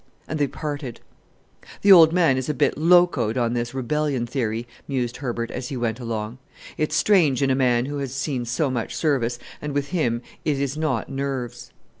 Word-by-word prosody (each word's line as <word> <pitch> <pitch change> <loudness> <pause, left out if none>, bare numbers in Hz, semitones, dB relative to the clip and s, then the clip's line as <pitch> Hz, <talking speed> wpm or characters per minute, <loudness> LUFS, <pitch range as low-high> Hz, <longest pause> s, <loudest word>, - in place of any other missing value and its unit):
and 155 - -3
they 145 - +2
parted. 145 -4 -5 0.8
"The 200 - +6
old 165 -4 +9
man 165 -6 +3
is 130 +2 -3
a 150 - 0
bit - - +2
locoed 160 -8 +3
on 120 -1 +1
this 120 +1 -3
rebellion 135 0 -1
theory," 115 -2 -2 0.2
mused 125 -3 -2
Herbert 120 -3 -3
as 125 0 -5
he 135 - -4
went 120 -1 -2
along. 115 0 -4 0.4
"It's 155 - -1
strange 155 -10 +3
in 135 - +2
a - - +3
man 125 -2 +2
who 145 +1 -4
has 135 -3 -3
seen 135 -2 -2
so 130 +4 0
much 120 -3 -3
service, 125 -6 0 0.2
and 150 -1 -4
with 145 0 -1
him 125 -10 0 0.2
it 145 -3 0
is 140 0 -1
not 155 0 -1
'nerves.'" 125 -3 -4
135 Hz, 190 wpm, -23 LUFS, 120-150 Hz, 0.8 s, old